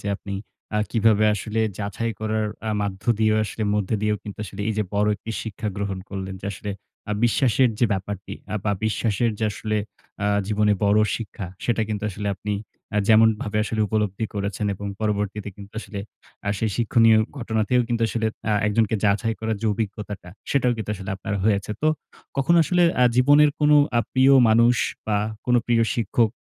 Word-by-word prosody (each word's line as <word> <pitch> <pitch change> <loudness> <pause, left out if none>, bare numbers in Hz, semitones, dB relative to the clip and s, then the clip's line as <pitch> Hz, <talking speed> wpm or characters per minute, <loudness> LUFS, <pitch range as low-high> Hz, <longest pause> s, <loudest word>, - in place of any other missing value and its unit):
যে, - - -8
আপনি 100 -1 -7 0.4
আ - - +3
কিভাবে 110 -2 +3
আসলে 110 +3 -2 0.2
যাচাই 105 +3 -2
করার 110 0 0 0.2
আ - - 0
মাধ্য 95 -2 -4 0.2
দিয়েও 110 0 +3
আসলে 110 +1 -5
মধ্য 105 -3 -1
দিয়েও 105 0 +2
আসলে - - -19
কিন্তু 105 0 -7 0.3
এইযে 105 0 0
বড় 105 +1 +2
একটি 115 - -8
শিক্ষা 110 0 -4
গ্রহণ 100 -2 -2
করলেন 95 -1 -5
যে, - - -6
আসলে 100 +2 -6 0.4
আ - - +1
বিশ্বাসের 125 +1 +3
যে 120 - +4
ব্যাপারটি 100 +1 -4 0.2
আ - - -1
বা, 105 - +2
বিশ্বাসের 110 +1 +1
যে 110 - 0
আসলে 110 +2 -2 0.5
আ - - +2 0.2
জীবনে 105 0 +2
বড় 100 +1 +4 0.2
শিক্ষা, 105 -3 -6 0.2
সেটা 115 -2 +1
কিন্তু 105 -2 -3
আসলে 100 +2 -4
আপনি 105 +2 -4 0.4
আ - - +1
যেমনভাবে 110 -1 +4
আসলে 110 0 -2
উপলব্ধি 105 0 -1
করেছেন। 100 +1 -2
এবং 100 +2 -7
পরবর্তীতে 105 -1 -1
কিন্তু 100 0 -12
আসলে 100 -3 -7 0.5
আ - - +1
সেই 110 - 0
শিক্ষণীয় 115 -1 +5 0.2
ঘটনাতেও 115 +1 +1
কিন্তু 115 -1 0
আসলে 110 -1 -1 0.2
আ - - +3
একজনকে 110 +1 +2
যাচাই 105 +3 +2
করার 110 -1 -1
যে 115 - -1
অভিজ্ঞতাটা, 105 -3 -5 0.2
সেটাও 125 -3 +2
কিন্তু 110 -1 -4
আসলে 95 -1 -7
আপনার 105 +2 -4
হয়েছে। 100 -1 +1
তো 155 - +4 0.5
কখনো 140 +6 +3
আসলে 175 +3 +2 0.2
আ - - +7
জীবনের 145 +3 +6
কোনো 150 0 +6 0.2
আ - - +5
প্রিয় 130 +1 +5 0.2
মানুষ 115 +2 +5 0.3
বা, 105 -2 +1 0.3
কোনো 125 -1 +4
প্রিয় 115 -1 +3
শিক্ষক 115 0 +2
110 Hz, 180 wpm, -23 LUFS, 100-115 Hz, 0.5 s, আ